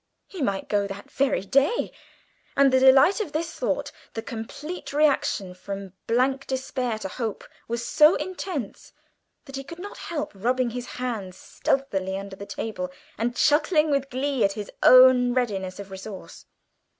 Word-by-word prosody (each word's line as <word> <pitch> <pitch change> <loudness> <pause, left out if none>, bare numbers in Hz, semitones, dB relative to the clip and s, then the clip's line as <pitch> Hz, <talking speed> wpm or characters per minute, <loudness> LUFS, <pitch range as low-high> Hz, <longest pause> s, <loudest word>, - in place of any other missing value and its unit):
He 375 - -8
might 200 -7 -1
go 205 -1 +1
that 200 +1 -9
very 275 -6 +1
day, 275 - +2 0.7
and 275 -1 +5
the 260 - +6
delight 265 +10 +6
of 325 -9 -5
this 325 +2 -2
thought - - -2 0.2
the 225 - -3
complete 280 +9 -7
reaction 280 -10 +2
from 195 0 -7
blank 265 +3 +1
despair 255 -3 -2
to 215 - -5
hope 220 +2 -4 0.2
was 235 +1 -3
so 305 +6 +6
intense 360 - -5 0.5
that 275 -2 -7
he 275 - -5
could 335 +5 -10
not 400 +3 -8
help 320 -4 -3
rubbing 245 +4 0
his 245 +1 -5
hands 220 -7 -4
stealthily 195 -9 -1
under 195 0 -7
the 200 +1 -9
table, 195 -3 -4 0.3
and 240 +2 -2
chuckling 305 +2 +3
with 275 -1 0
glee 265 -1 0
at 195 0 +2
his 210 -1 -6
own 255 -1 +7
readiness 195 -7 -1
of 200 -1 -8
resource. 190 +1 -9
250 Hz, 160 wpm, -25 LUFS, 200-280 Hz, 0.7 s, own